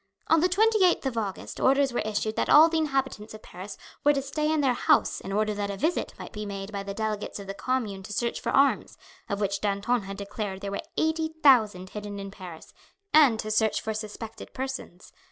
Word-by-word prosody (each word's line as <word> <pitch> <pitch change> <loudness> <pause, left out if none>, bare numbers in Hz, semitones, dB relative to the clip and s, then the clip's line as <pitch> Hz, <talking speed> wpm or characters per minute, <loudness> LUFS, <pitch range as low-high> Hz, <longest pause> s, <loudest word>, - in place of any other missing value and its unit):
On 325 - +6
the 360 +4 +3
28th 400 -3 +3
of 265 -3 -1
August 205 -4 -4
orders 275 0 +3
were - - 0
issued 215 0 -2
that - - -1
all 315 +3 +8
the 325 -1 +1
inhabitants 270 -8 -2
of 215 - -13
Paris 185 +3 -9 0.3
were 290 - +5
to 275 - 0
stay 300 +3 -1
in 315 -1 +2
their 265 -3 +3
houses - - +2
in 195 - -7
order 210 +1 +1
that 205 -1 -3
a 200 - -4
visit 320 - -1
might - - -9
be 210 - -5
made 200 0 -6
by 200 -1 -4
the 200 0 -6
delegates 215 -1 -3
of 200 - -8
the 195 - -5
Commune 220 -4 -2
to 200 - -9
search 235 +3 -2
for - - -2
arms, 275 +1 +2 0.3
of 200 -1 -2
which 200 -1 -1
Danton 210 +4 0
had 195 0 -7
declared 200 -1 -5
there 200 - -4
were 200 - -3 0.2
eighty 320 0 0
thousand 215 -9 +4
hidden 205 -1 -6
in 195 0 -6
Paris, 180 -5 -11 0.4
and 280 -8 +6
to 215 - -5
search 220 0 +2
for 220 - -3
suspected 215 +1 -7
persons. 260 -9 -6
215 Hz, 220 wpm, -27 LUFS, 200-275 Hz, 0.4 s, all